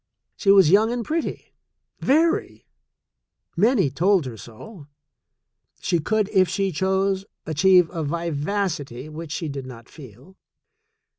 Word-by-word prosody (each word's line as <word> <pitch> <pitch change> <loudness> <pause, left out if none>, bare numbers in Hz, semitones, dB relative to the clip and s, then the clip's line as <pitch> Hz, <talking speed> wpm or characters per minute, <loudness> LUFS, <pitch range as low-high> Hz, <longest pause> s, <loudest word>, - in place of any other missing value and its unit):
She 200 - -1
was 195 -5 +6
young, 225 +4 +3
pretty, 320 +7 -4 0.5
very 320 +5 +1 0.4
— - - -53
many 205 - +2
told 175 +4 +2
her 125 -3 -6
so. 140 - -12 0.9
She 170 - 0
could, 215 +5 0
if 190 -3 +3
she 195 -1 -1
chose, 190 +3 0 0.2
achieve 180 +3 +4
a 165 -3 -4
vivacity 155 -3 -3
which 155 0 -8
she 165 0 -3
did 140 -3 -6
not 115 -2 -11
feel. 135 - -15
180 Hz, 125 wpm, -23 LUFS, 145-200 Hz, 0.9 s, was